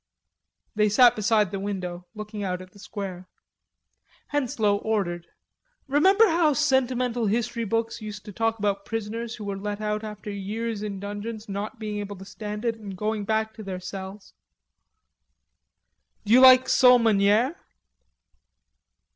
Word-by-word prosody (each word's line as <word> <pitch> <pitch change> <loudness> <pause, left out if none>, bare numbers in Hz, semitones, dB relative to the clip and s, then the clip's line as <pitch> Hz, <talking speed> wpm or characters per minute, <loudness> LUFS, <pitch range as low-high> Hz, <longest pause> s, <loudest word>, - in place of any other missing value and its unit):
They 210 0 +2
sat 240 +3 +6
beside 215 -2 +2
the 195 - -3
window 180 -3 -5
looking 210 -1 -6
out 180 -2 -2
at 185 0 -12
the 205 - -18
square. 190 -3 -7 1.0
Henslowe 225 -7 +1
ordered. 185 -6 -2 0.6
"Remember 380 +11 +5
how 325 -3 +3
sentimental 255 -5 +1
history 230 +2 -1
books 230 +2 -2
used 210 -1 -8
to 210 - -8
talk 225 +2 0
about 200 -1 -1
prisoners 225 +1 -4
who 215 - -9
were 200 -1 -4
let 205 +1 -4
out 210 0 -2
after 210 -1 -7
years 210 +2 -4
in 205 -2 -4
dungeons, 205 +2 -6
not 205 +5 -5
being 210 -2 -4
able 205 0 -5
to 190 0 -11
stand 210 +2 -6
it, 230 -1 0
and 200 -3 -8
going 215 +1 -2
back 220 +1 0
to 225 - -10
their 190 -2 -5
cells?" 190 +2 -8 1.9
"D'you 230 +5 +6
like 260 0 +8
sole 250 -1 +6
meuniere?" 220 +4 +3
215 Hz, 145 wpm, -25 LUFS, 200-230 Hz, 1.9 s, like